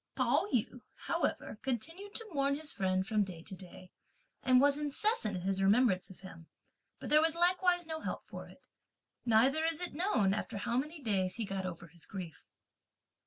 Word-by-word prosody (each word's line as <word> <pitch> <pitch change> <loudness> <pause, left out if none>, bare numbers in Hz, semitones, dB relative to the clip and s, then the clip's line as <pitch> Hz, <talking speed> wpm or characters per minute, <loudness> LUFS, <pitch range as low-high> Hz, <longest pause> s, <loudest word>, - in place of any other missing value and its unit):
Pao 390 - +2
yü, 250 0 -1 0.2
however, 210 - -1
continued 330 - -3
to 455 - -1
mourn 280 -1 +1
(his 300 +1 -5
friend) 185 -2 0
from 215 0 +2
day 175 -4 -8
to 190 - -6
day, 185 0 -10 0.5
and 255 -1 +5
was 280 +1 +5
incessant 295 - 0
in - - -5
his 195 0 0
remembrance 195 -1 +3
of 190 - -14
him, 165 -4 -11 0.5
but - - -6
there 305 +1 +7
was 325 0 +2
likewise 355 0 +3
no 320 0 -5
help - - -5
for - - -9
it. - - -18 0.6
Neither 255 +8 +4
is 325 -1 0
it 360 - -4
known 280 - +2
after 205 - -3
how 235 +4 -2
many 300 +3 -3
days 190 -5 0
he 230 - -2
got 195 -1 -3
over 175 -1 -7
his 170 +1 -12
grief. 180 -6 -8
235 Hz, 185 wpm, -33 LUFS, 190-315 Hz, 0.6 s, there